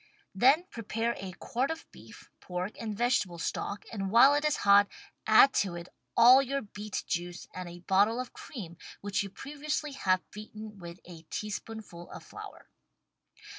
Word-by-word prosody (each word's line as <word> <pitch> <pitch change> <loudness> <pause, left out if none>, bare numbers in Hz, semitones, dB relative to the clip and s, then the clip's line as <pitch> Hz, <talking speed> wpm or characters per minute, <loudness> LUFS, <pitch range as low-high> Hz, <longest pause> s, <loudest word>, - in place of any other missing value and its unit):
Then 265 - +5
prepare 230 +1 -2
a 190 -1 -6
quart 250 +8 -2
of 325 0 -5
beef, - - -15
pork 180 +2 -4
and 215 -3 -4
vegetable 235 -7 +1
stock 200 +4 -3
and 195 -3 -2
while 240 +7 +7
it 290 +1 +1
is 300 -2 +2
hot 200 0 +7 0.4
add 220 +5 +7
to 190 -4 -3
it 170 0 -8 0.3
all 245 +3 +9
your 275 0 -2
beet 210 0 -5
juice 175 0 -4
and 185 -1 -6
a 175 0 -11
bottle 200 +6 +3
of 255 - -5
cream 175 - -9 0.2
which 200 -1 -1
you 200 - -4
previously 300 +6 -4
have 185 -8 0
beaten 215 0 -9
with 170 0 -9
a 170 -2 -11
teaspoonful 210 -4 -6
of - - -10
flour. - - -11
210 Hz, 165 wpm, -30 LUFS, 185-245 Hz, 0.4 s, all